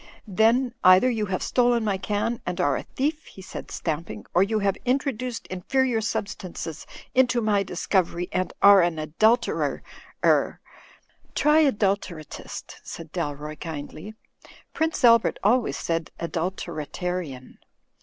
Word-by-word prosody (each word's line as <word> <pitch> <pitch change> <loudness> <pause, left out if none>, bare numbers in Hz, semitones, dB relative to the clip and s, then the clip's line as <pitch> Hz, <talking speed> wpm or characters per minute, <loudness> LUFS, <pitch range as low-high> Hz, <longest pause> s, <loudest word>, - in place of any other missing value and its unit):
"Then, 230 +5 +2
either 185 +8 +7
you 215 -3 -1
have 185 -1 -2
stolen 240 -2 +2
my 200 -3 0
can 210 +4 -2
and 180 0 -4
are 145 -1 +2
a - - -2
thief," 300 +3 -3
he 190 - -12
said, - - -8
stamping, 155 - -4
"or 180 - +4
you 215 +3 +2
have 200 -2 +1
introduced 255 -2 -1
inferior 235 +5 0
substances 195 -7 -5 0.3
into 250 -1 +3
my 210 -3 +2
discovery 180 -1 -1
and 185 0 -1
are 200 -1 +9
an 170 -2 +1
adulterer— 215 +11 +1 0.4
er - - +3 0.3
— - - -26
" - - -36
"Try 300 +1 +4
adulteratist," 195 - -3
said 165 -2 -9
Dalroy, 150 -2 -4
kindly. 160 +6 -7 0.6
"Prince 320 -2 -1
Albert 230 -2 +5
always 210 - +2
said 165 -1 -2
'adulteratarian.' 170 -3 -4
195 Hz, 135 wpm, -25 LUFS, 170-235 Hz, 0.6 s, are